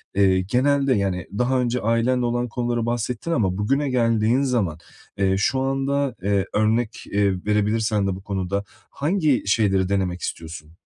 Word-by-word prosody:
eee, 95 Hz, -2 st, +4 dB
genelde, 135 Hz, +6 st, +2 dB
yani, 95 Hz, -4 st, -1 dB
daha 125 Hz, +1 st, +1 dB
önce 125 Hz, 0 st, -1 dB
ailenle 115 Hz, +3 st, +1 dB
olan 120 Hz, +1 st, -1 dB
konuları 120 Hz, 0 st, -1 dB
bahsettin 120 Hz, +6 st, -2 dB
ama 95 Hz, -, +1 dB
bugüne 135 Hz, +8 st, 0 dB
geldiğin 115 Hz, 0 st, +2 dB
zaman, 115 Hz, -, 0 dB, 0.4 s
eee, 95 Hz, -1 st, +2 dB
şu 130 Hz, +6 st, +1 dB
anda, 135 Hz, -1 st, 0 dB
eee, 100 Hz, -1 st, +1 dB
örnek 110 Hz, +2 st, 0 dB, 0.4 s
verebilirsen 105 Hz, 0 st, +1 dB
de 95 Hz, -, -1 dB
bu 95 Hz, -, -9 dB
konuda 100 Hz, 0 st, -2 dB, 0.3 s
hangi 155 Hz, -3 st, +1 dB
şeyleri 95 Hz, -3 st, +2 dB
denemek 95 Hz, -3 st, -1 dB
istiyorsun? 80 Hz, 0 st, -7 dB
115 Hz, 145 wpm, -23 LUFS, 100-125 Hz, 0.4 s, eee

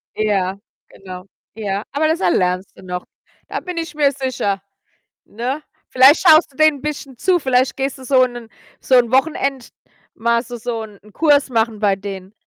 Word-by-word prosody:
Ja, 195 Hz, -3 st, 0 dB, 0.3 s
genau. 185 Hz, -1 st, -11 dB, 0.3 s
Ja, 205 Hz, -1 st, -3 dB
aber 310 Hz, +2 st, +1 dB
das 320 Hz, +1 st, 0 dB
erlernst 180 Hz, +1 st, 0 dB
du -, -, -14 dB
noch. 180 Hz, -1 st, -5 dB, 0.4 s
Da -, -, -4 dB
bin 360 Hz, -2 st, -7 dB
ich 330 Hz, -1 st, -4 dB
mir 285 Hz, -2 st, +3 dB
sicher, 255 Hz, -8 st, -2 dB, 0.6 s
ne? 255 Hz, +7 st, -4 dB, 0.3 s
Vielleicht 265 Hz, +4 st, +6 dB
schaust 315 Hz, -1 st, +6 dB
du -, -, -25 dB
denen 310 Hz, -3 st, +3 dB
bisschen 285 Hz, -4 st, -6 dB
zu. 360 Hz, +3 st, +2 dB
Vielleicht 260 Hz, -2 st, +1 dB
gehst 270 Hz, 0 st, -3 dB
du 260 Hz, -, -12 dB
so 255 Hz, -1 st, +4 dB
'nen 240 Hz, -2 st, -8 dB, 0.3 s
so 260 Hz, -, +2 dB
'n 240 Hz, -1 st, +4 dB
Wochenend 270 Hz, -2 st, 0 dB, 0.4 s
mal 235 Hz, 0 st, +1 dB
so 240 Hz, +1 st, -8 dB
so 230 Hz, -1 st, -4 dB
'n 210 Hz, -2 st, -12 dB
Kurs 290 Hz, -3 st, +3 dB
machen 225 Hz, -2 st, 0 dB
bei 200 Hz, -2 st, +2 dB
denen. 195 Hz, 0 st, -8 dB
245 Hz, 175 wpm, -19 LUFS, 205-280 Hz, 0.6 s, Vielleicht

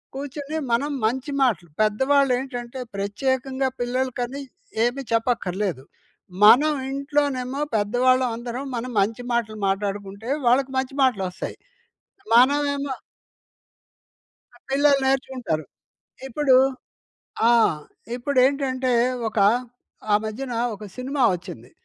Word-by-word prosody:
కూర్చొని 285 Hz, +2 st, -5 dB
మనం 275 Hz, +6 st, +1 dB
మంచి 260 Hz, +6 st, -1 dB
మాటలు 190 Hz, -9 st, 0 dB
పెద్దవాళ్ళేంటంటే, 255 Hz, +2 st, +1 dB, 0.2 s
ప్రత్యేకంగా 260 Hz, +6 st, -1 dB
పిల్లలకని 255 Hz, +1 st, -2 dB, 0.4 s
ఏమీ 245 Hz, +3 st, 0 dB
చెప్పక్కర్లేదు. 205 Hz, -, -1 dB, 0.6 s
మనం 290 Hz, +8 st, +7 dB, 0.2 s
ఇంట్లోనేమో 275 Hz, -2 st, -1 dB, 0.2 s
పెద్దవాళ్ళం 250 Hz, +4 st, +2 dB
అందరం 240 Hz, +3 st, -5 dB
మనం 245 Hz, +2 st, -4 dB
మంచి 225 Hz, +5 st, -1 dB
మాటలు 220 Hz, -2 st, -1 dB
మాట్లాడుకుంటే, 200 Hz, +2 st, -3 dB, 0.2 s
వాళ్ళకి 260 Hz, +2 st, +3 dB
మంచి 260 Hz, +1 st, -1 dB
మాటలొస్తాయి. 190 Hz, -8 st, -1 dB, 0.8 s
మనమేమో 285 Hz, +2 st, +3 dB, 1.6 s
ఆ! -, -, -17 dB
పిల్లలు 280 Hz, +1 st, +4 dB
నేర్చుకుంటారు. 260 Hz, -, -1 dB, 0.6 s
ఇప్పుడు 265 Hz, 0 st, +3 dB, 1.0 s
ఆ! -, -, +6 dB, 0.6 s
ఇప్పుడేంటంటే, 260 Hz, 0 st, +1 dB, 0.4 s
ఒక 220 Hz, -, -4 dB, 0.7 s
ఆ -, -, +6 dB
మధ్యన 240 Hz, +4 st, -4 dB, 0.2 s
ఒక 210 Hz, +1 st, -10 dB
సినిమా 265 Hz, +2 st, -2 dB
వచ్చింది. 175 Hz, -, -9 dB
255 Hz, 90 wpm, -23 LUFS, 220-270 Hz, 1.6 s, మనం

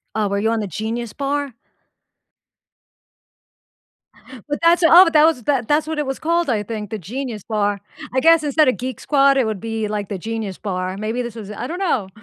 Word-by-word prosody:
Oh, 215 Hz, -1 st, +1 dB
were 200 Hz, 0 st, -1 dB
you 220 Hz, +2 st, +1 dB
on 230 Hz, -, 0 dB
the 210 Hz, -, -3 dB
Genius 220 Hz, +5 st, -4 dB
Bar? 280 Hz, -1 st, -2 dB, 3.0 s
But 290 Hz, -, -2 dB
that's 340 Hz, +1 st, +4 dB
oh, 345 Hz, +2 st, +8 dB
that 305 Hz, 0 st, +6 dB
was 315 Hz, -7 st, +1 dB
that 255 Hz, -3 st, 0 dB
that's 300 Hz, +1 st, +1 dB
what 315 Hz, -1 st, -3 dB
it 295 Hz, -, -1 dB
was 270 Hz, 0 st, -4 dB
called, 335 Hz, 0 st, 0 dB
I 215 Hz, -4 st, 0 dB
think, 210 Hz, -1 st, -6 dB
the 220 Hz, -, -4 dB
Genius 230 Hz, -, -6 dB
Bar, 205 Hz, -2 st, -1 dB, 0.3 s
I 260 Hz, -, +2 dB
guess 330 Hz, +2 st, +5 dB
instead 300 Hz, +1 st, +3 dB
of 255 Hz, -, +2 dB
Geek 255 Hz, +1 st, -5 dB
Squad, 275 Hz, -1 st, +3 dB
it 260 Hz, -, +2 dB
would 215 Hz, -3 st, -3 dB
be, 225 Hz, 0 st, -3 dB
like, 210 Hz, -2 st, -4 dB
the 200 Hz, -, -3 dB
Genius 220 Hz, -1 st, -5 dB
Bar, 185 Hz, -1 st, -4 dB
maybe 220 Hz, +4 st, -2 dB
this 235 Hz, -2 st, -6 dB
was 210 Hz, -2 st, -8 dB
I 230 Hz, -, -5 dB
don't 350 Hz, +5 st, -5 dB
know. 260 Hz, -, 0 dB
235 Hz, 205 wpm, -20 LUFS, 210-290 Hz, 3.0 s, oh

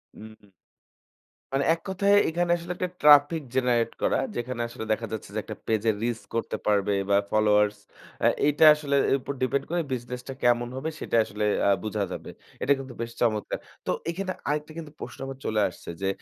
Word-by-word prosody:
হুম। 110 Hz, -2 st, -14 dB, 1.0 s
মানে 135 Hz, +1 st, +1 dB
এক 165 Hz, -, -6 dB
কথায় 200 Hz, +2 st, +2 dB, 0.2 s
এখানে 175 Hz, +1 st, 0 dB
আসলে 170 Hz, +1 st, -5 dB
একটা 180 Hz, -, -2 dB
ট্রাফিক 150 Hz, +2 st, +6 dB
জেনারেট 125 Hz, -3 st, +2 dB
করা। -, -, +2 dB, 0.2 s
যেখানে 120 Hz, 0 st, -3 dB
আসলে 115 Hz, -1 st, -7 dB
দেখা 115 Hz, +1 st, 0 dB
যাচ্ছে 110 Hz, -3 st, -5 dB
যে, -, -, +1 dB
একটা 110 Hz, -, -7 dB
পেইজে 110 Hz, 0 st, +2 dB
রিচ 120 Hz, 0 st, -1 dB
করতে 115 Hz, -, -2 dB
পারবে 105 Hz, -1 st, +2 dB, 0.2 s
বা 100 Hz, -, +5 dB
ফলোয়ার্স 105 Hz, -1 st, +3 dB, 0.7 s
এইটা 150 Hz, +2 st, +4 dB
আসলে 145 Hz, -2 st, -1 dB
এর -, -, +4 dB
উপর 140 Hz, -, -4 dB
ডিপেন্ড 135 Hz, +2 st, +1 dB
করে 175 Hz, +1 st, 0 dB
বিজনেস 125 Hz, 0 st, -5 dB
টা 135 Hz, -, -4 dB
কেমন 120 Hz, 0 st, +3 dB
হবে 135 Hz, +5 st, -3 dB
সেটা -, -, -2 dB
আসলে 105 Hz, 0 st, -3 dB, 0.2 s
আ -, -, +5 dB
বুঝা 105 Hz, -1 st, -1 dB
যাবে। -, -, -6 dB, 0.3 s
এটা 140 Hz, -, +4 dB
কিন্তু 135 Hz, -2 st, -8 dB
বেশ 115 Hz, 0 st, -4 dB
চমৎকার। 110 Hz, -3 st, 0 dB, 0.3 s
তো -, -, 0 dB, 0.2 s
এখানে 185 Hz, +2 st, -3 dB, 0.2 s
আরেকটা 150 Hz, +1 st, -2 dB
কিন্তু 155 Hz, -3 st, -7 dB
প্রশ্ন -, -, -8 dB
আমার 135 Hz, -, -7 dB
চলে 110 Hz, -, 0 dB
আসছে 90 Hz, -, -12 dB
যে, 95 Hz, -, 0 dB
120 Hz, 185 wpm, -26 LUFS, 110-150 Hz, 1.0 s, ট্রাফিক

